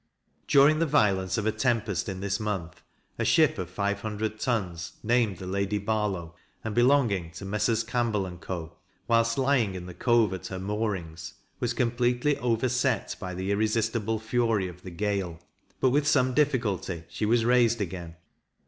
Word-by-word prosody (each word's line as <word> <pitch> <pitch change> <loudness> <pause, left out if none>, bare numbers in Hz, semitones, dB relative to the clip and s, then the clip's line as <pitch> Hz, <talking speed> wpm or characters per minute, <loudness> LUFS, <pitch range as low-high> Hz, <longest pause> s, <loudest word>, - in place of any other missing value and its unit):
During 145 +3 +5
the 165 - +2
violence 95 - +2
of 105 - -1
a 110 - +3
tempest 110 -4 0
in 95 -1 -5
this 100 0 -1
month, 95 -5 -4 0.4
a - - +1
ship - - +3
of - - -4
five 100 0 -2
hundred 110 0 -3
tons, 90 -9 -2
named 115 -4 +2
the 95 - -8
Lady 100 +2 -1
Barlow, 100 -5 -2 0.3
and 110 - -3
belonging 120 -8 +3
to 95 - -8
Messrs. 105 +3 +1
Campbell 115 -4 0
and 90 -2 -9
Co. 85 -2 -6 0.3
whilst 115 +1 +2
lying 130 -7 +2
in 90 -1 -6
the 90 - -8
Cove 115 -1 +2
at 95 - -6
her 95 - -5
moorings, 95 -5 -4 0.2
was 120 0 -1
completely 120 +3 +1
overset 125 0 0
by 90 -1 -5
the 95 +2 -2
irresistible 110 +1 0
fury 110 -3 0
of 90 0 -11
the 95 - -8
gale; 95 -2 -2 0.4
but, 130 - +3
with 145 +2 +2
some 130 -3 +3
difficulty, 115 - 0
she 105 - -3
was 115 0 +3
raised 120 -2 +4
again. 85 -4 -5
105 Hz, 165 wpm, -27 LUFS, 95-120 Hz, 0.4 s, During